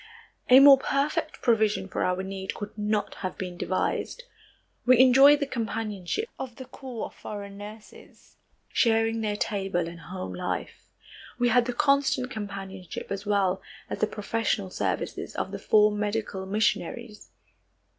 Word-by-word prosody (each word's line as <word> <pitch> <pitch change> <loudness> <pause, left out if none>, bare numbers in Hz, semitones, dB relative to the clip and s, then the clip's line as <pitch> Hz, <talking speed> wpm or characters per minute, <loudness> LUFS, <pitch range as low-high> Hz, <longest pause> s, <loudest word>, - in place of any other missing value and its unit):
A 255 +1 +10
more 275 -1 +9
perfect 280 +2 -1
provision 220 -5 +2
for - - -2
our 180 +1 0
need 190 0 -5
could 205 0 -7
not 210 0 -1
have 185 - -4
been 180 -2 -5
devised. 185 - -2 0.6
We 250 0 +6
enjoyed 270 +3 +7
the 285 - 0
companionship 225 - -3
of 250 -3 -6
the 260 - -9
corps 250 -3 -7
of - - -10
foreign 200 -1 -8
nurses, 210 +1 -13 0.4
sharing 225 -1 +2
their 210 -1 -1
table 195 -5 -1
and 170 0 -9
home 180 - -7
life. 90 - -5 0.5
We 245 0 +2
had 245 -1 +4
the 245 - -2
constant 275 -1 +2
companionship 195 -5 -7
as 200 +1 -4
well 195 -2 +1 0.3
as - - -3
the 215 - +2
professional 210 -2 -2
services - - -3
of - - -3
the - - -5
four 210 0 +4
medical 210 -2 -3
missionaries. 210 +1 -2
210 Hz, 145 wpm, -27 LUFS, 195-245 Hz, 0.6 s, A